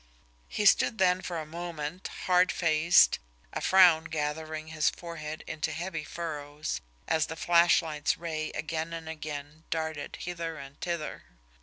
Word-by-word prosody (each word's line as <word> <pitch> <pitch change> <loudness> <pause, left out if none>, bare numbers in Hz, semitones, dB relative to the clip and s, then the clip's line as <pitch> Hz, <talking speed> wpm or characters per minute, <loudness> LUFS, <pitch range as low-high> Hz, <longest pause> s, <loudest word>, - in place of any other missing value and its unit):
He 210 - -2
stood 220 +2 +5
then 185 -1 +3
for 175 -2 -4
a 155 - -5
moment, 165 +1 -5 0.2
hardfaced, 175 -2 +4 0.3
a - - -3
frown 175 -4 +6
gathering 155 0 -3
his 155 -1 +2
forehead 155 -3 -7
into 155 -1 -2
heavy 165 0 -4
furrows, 150 -2 -4 0.3
as 160 -1 +2
the 160 - -5
flashlight's 170 -3 +3
ray 155 -2 -3
again 160 +2 -3
and 165 -1 -6
again 150 -1 -6
darted 160 -2 -3
hither 165 -2 -4
and 140 -1 -11
thither. 170 -3 -3
160 Hz, 135 wpm, -29 LUFS, 155-170 Hz, 0.3 s, frown